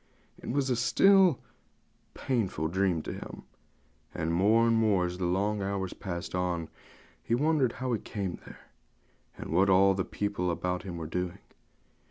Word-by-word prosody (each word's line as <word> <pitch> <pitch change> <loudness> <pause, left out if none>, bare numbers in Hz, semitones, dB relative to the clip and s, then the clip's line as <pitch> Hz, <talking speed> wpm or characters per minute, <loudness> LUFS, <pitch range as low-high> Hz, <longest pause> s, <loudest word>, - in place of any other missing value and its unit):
It - - -7
was 130 -2 0
still 190 +3 +5
a - - -28
painful 95 - -1
dream 90 -3 0
to - - -5
him; - - -9 0.7
and 80 +1 -1
more 105 +6 +4
and 115 0 +3
more, 105 -5 +2
as 90 +1 -5
the 90 - 0
long 100 +3 0
hours 95 -1 -3
passed 85 -3 -6
on, 90 -3 -2 0.5
he 115 - 0
wondered 145 -2 +2
how 130 -1 -3
he 110 - 0
came 95 -5 -5
there, - - -12 0.8
and - - -7
what 95 +4 +3
all 95 +1 +5
the 95 -1 -1
people 100 -3 -2
about 90 +1 -2
him 90 -2 -7
were 80 - -5
doing. 90 +2 -3
95 Hz, 165 wpm, -29 LUFS, 90-115 Hz, 0.8 s, still